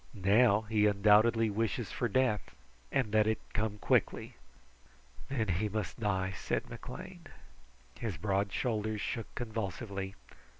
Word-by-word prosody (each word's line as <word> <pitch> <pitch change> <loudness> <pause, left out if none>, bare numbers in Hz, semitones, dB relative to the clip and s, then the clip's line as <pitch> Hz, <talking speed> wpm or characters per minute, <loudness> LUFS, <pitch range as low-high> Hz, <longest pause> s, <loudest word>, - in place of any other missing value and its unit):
Now 105 +2 +4
he 110 -1 +2
undoubtedly 105 +2 +4
wishes 115 +1 -1
for 120 - -1
death, 120 - 0 0.4
and 130 -6 +1
that 110 0 +4
it 110 - +2 0.2
come 105 0 -1
quickly." - - +1 1.0
"Then 120 -6 0
he 95 +4 0
must 105 +1 -3
die," 95 -3 0
said - - -3
McLean. 65 - -9 0.7
His 105 -8 -3
broad 100 +2 0
shoulders 110 -1 -1
shook 115 +2 -4
convulsively. 100 -3 -4
105 Hz, 125 wpm, -32 LUFS, 100-115 Hz, 1.0 s, Now